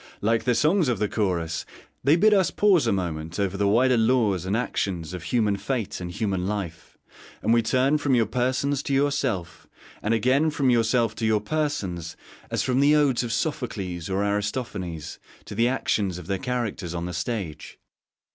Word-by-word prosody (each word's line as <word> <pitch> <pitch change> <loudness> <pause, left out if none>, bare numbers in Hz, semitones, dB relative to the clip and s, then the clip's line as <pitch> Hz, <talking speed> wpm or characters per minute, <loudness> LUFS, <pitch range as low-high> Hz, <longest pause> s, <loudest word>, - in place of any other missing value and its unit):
Like 115 +2 +1
the 125 -1 +2
songs 160 - +3
of 120 -3 +1
the 105 +2 0
Chorus, 90 -7 -1 0.4
they 140 +4 +5
bid 210 +5 +5
us 190 -3 +3
pause 185 - +3
a - - +3
moment 85 -3 -3
over 100 -1 0
the 100 +1 +1
wider 125 +4 +4
laws 110 -6 +2
and 100 +4 +1
actions 90 -8 -2
of 90 - -5
human 110 -5 +1
fate 115 -5 -3
and 90 - -4
human 95 -1 -2
life, 95 -6 -5 0.5
and 115 - +3
we 115 - +4
turn 130 +6 +2
from 145 -3 +2
your 115 -2 +3
persons 130 +5 0
to 140 - -1
yourself, 135 - -1 0.3
and 110 +2 +1
again 130 +7 +2
from 140 -4 +1
yourself 115 -1 +2
to 115 - -1
your 110 -1 +3
persons, 105 - -3 0.3
as - - -1
from 130 0 +1
the 145 +2 +5
odes 145 -5 +3
of 120 -2 -3
Sophocles 105 - -3
or 95 +2 0
Aristophanes 100 - -3 0.3
to - - -8
the 115 +3 +2
action 110 -6 0
of 90 -1 -7
their 95 +2 -2
characters 110 -8 -3
on 85 0 -3
the 90 - -5
stage. 90 -4 -4
110 Hz, 185 wpm, -25 LUFS, 95-130 Hz, 0.5 s, they